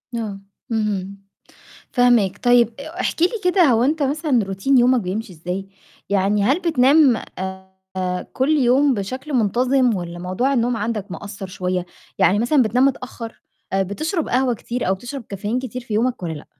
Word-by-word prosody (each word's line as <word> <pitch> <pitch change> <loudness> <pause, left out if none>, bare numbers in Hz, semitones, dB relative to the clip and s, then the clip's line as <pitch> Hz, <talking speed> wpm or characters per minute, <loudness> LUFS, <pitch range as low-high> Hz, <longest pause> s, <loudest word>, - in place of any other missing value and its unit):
آه. 210 -4 -4 0.3
اهم. 200 -3 -2 0.8
فاهماك. 235 -6 +3
طيب 245 -1 +5
أ 315 +5 -7
احكِ - - -1
لي 350 - +6 0.2
كده 360 0 +4
هو 240 -6 +4
أنت 300 +2 +1
مثلًا 280 -4 +1
روتين 195 +8 +1
يومَك 250 +1 +4
بيمشي 195 +1 -4
إزاي، 180 +4 -5 0.4
يعني 200 +1 +2
هل 270 - +2
بتنام 285 -5 +4 0.8
آآ 180 -1 -2
كل 260 +2 0
يوم 275 -1 +4
بشكل 255 +8 -5
منتَظم 245 +1 +2
والّا 175 -1 -6
موضوع 185 +10 -1
النوم 240 -2 +1
عندك 210 -2 -3
مأثّر 200 -1 -7
شوية؟ 180 -1 -3 0.3
يعني 200 - +4
مثلًا 255 +4 +3
بتنام 245 +4 +2
متأخّر 250 -4 -3 0.3
آآ 195 0 +2
بتشرب 310 - -2
قهوة 255 0 +2
كتير 235 0 -4
أو 190 - +3
بتشرب 245 +7 -7
كافيين 205 +4 -2
كتير 255 -1 -5
في 225 -3 -5
يومك 245 +1 0
والّا 170 -2 -3
لأ؟ 150 - -10
235 Hz, 165 wpm, -21 LUFS, 195-265 Hz, 0.8 s, لي